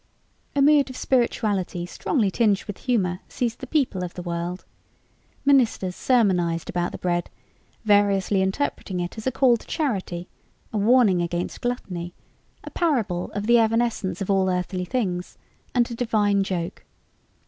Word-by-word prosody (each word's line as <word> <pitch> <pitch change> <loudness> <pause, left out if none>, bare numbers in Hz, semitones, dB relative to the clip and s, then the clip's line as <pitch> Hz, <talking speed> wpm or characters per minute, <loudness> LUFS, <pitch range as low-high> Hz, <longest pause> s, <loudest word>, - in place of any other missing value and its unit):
A 280 - +4
mood 290 -1 +5
of 260 - -8
spirituality 205 -8 0
strongly 205 - 0
tinged 210 -2 +2
with 205 -3 -7
humor 190 -8 +1
seized 235 -2 -2
the 260 - -7
people 250 -11 0
of 175 - -6
the 180 - -6
world. 175 +1 -4 0.8
Ministers 240 -9 +3
sermonized 180 -9 +1
about 175 -1 -1
the - - -6
bread, 175 -1 -1 0.6
variously 200 -2 +3
interpreting 190 -2 -2
it 175 0 -4
as 220 - -5
a - - +2
call 250 -1 +4
to - - -17
charity, 190 - -2 0.5
a - - 0
warning 210 -4 +4
against 175 +1 -3
gluttony, 180 -8 -4 0.5
a - - -8
parable 230 - 0
of 205 0 -3
the 235 +1 +5
evanescence 225 -3 0
of 195 - -1
all 190 -1 +3
earthly 180 0 -2
things, 180 -6 -2 0.4
and 240 0 +2
a - - -3
divine 215 -4 +1
joke. 180 -3 -4
200 Hz, 150 wpm, -24 LUFS, 180-240 Hz, 0.8 s, mood